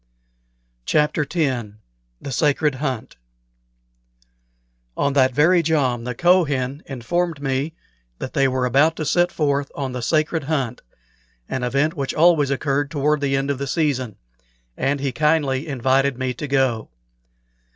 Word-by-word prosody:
CHAPTER 150 0 +2
X 135 -9 0 0.5
THE 140 - -7
SACRED 150 +2 +2
HUNT 130 - -4 1.8
On 140 -1 +1
that 130 -2 +4
very 160 +7 +4
jom 135 -7 0
the 125 -1 -4
Kohen 145 -5 +2
informed 165 +5 -2
me 140 +3 -2 0.4
that - - -6
they 135 -3 +3
were 130 -1 0
about 140 +6 +3
to 155 - -4
set 175 +5 +2
forth 140 -2 0
on 135 -2 -3
the 125 -1 -4
"sacred 155 +3 0
hunt," 135 -6 -2 0.7
an 130 - -3
event 140 +6 +1
which 140 -5 -3
always 160 -3 +4
occurred 140 +1 0
toward 150 0 0
the 135 -1 +1
end 135 +1 -1
of 135 - -3
the 140 - -3
season, 130 - -1 0.6
and 140 +1 0
he 135 -1 -1
kindly 150 0 +1
invited 135 0 +1
me 130 -1 -2
to 145 +5 -6
go. 130 -5 0
140 Hz, 140 wpm, -21 LUFS, 130-155 Hz, 1.8 s, that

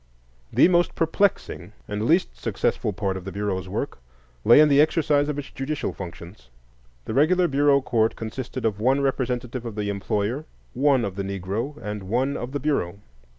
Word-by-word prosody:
The - - +6
most 175 -1 +2
perplexing 160 - 0
and 105 +1 -2
least 170 +7 +2
successful - - -1
part 95 -1 -2
of 95 - -8
the 95 - -6
Bureau's 95 -2 -3
work 90 - -4 0.4
lay 120 +5 +7
in 155 - +7
the 145 0 +5
exercise 150 -2 +2
of 150 - -2
its 145 - -6
judicial 140 +2 -3
functions. 85 - -10 0.6
The - - -4
regular 175 +7 +4
Bureau 140 -1 +3
court 115 -3 +1
consisted 120 +2 -5
of 105 -2 0
one 130 +5 +2
representative 125 -2 -2
of 115 -3 -6
the 105 -1 -2
employer, 105 +7 -2 0.3
one 135 -2 +3
of 100 -1 -5
the 100 - -1
Negro, 100 +9 -4
and 105 -5 -6
one 130 +5 +1
of 125 - -5
the 145 - -2
Bureau. 125 - -1
120 Hz, 175 wpm, -24 LUFS, 100-145 Hz, 0.6 s, lay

